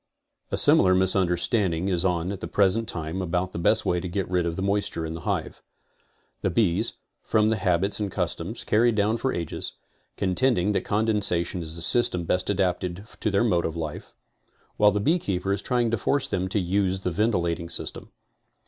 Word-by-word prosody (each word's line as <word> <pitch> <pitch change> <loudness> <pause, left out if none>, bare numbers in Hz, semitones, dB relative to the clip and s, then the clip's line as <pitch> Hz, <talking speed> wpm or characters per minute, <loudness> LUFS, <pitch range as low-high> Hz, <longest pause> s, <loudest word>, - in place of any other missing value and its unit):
A - - -1
similar 95 -1 +6
misunderstanding 95 0 +1
is 90 -2 0
on 90 -1 0
at 100 - -6
the - - -4
present 105 +3 +2
time 85 +2 -4
about 90 +1 -2
the - - -5
best - - +2
way 90 - +1
to 90 - -5
get 95 +1 -2
rid 90 -1 0
of 85 - -3
the 95 - -3
moisture 100 -4 -1
in 80 - -5
the 80 - -7
hive. - - -3 0.8
The - - 0
bees, 95 -7 +1 0.3
from 110 0 +2
the 110 - +1
habits 95 +1 0
and 100 -2 -2
customs, 90 +4 -3
carried 115 +1 +2
down 105 +2 +1
for 130 +3 -1
ages, 85 -2 -4 0.4
coritending 100 +1 +1
that - - -1
condensation 100 -5 +1
is 80 -1 -5
the 85 - -2
system 105 -5 +3
best 90 +2 0
adapted 95 -1 -1
to 110 - 0
their 100 +2 +2
mode 90 -7 +2
of 80 - -3
life, 80 -2 -6 0.6
while 105 - +5
the 105 - -1
beekeeper 100 - 0
is 100 - -2
trying 120 -1 0
to 115 - +1
force 140 +5 0
them 95 0 -2
to 105 - 0
use 95 +1 0
the 90 - -2
ventilating 85 -4 0
system. - - -3
95 Hz, 190 wpm, -25 LUFS, 85-105 Hz, 0.8 s, similar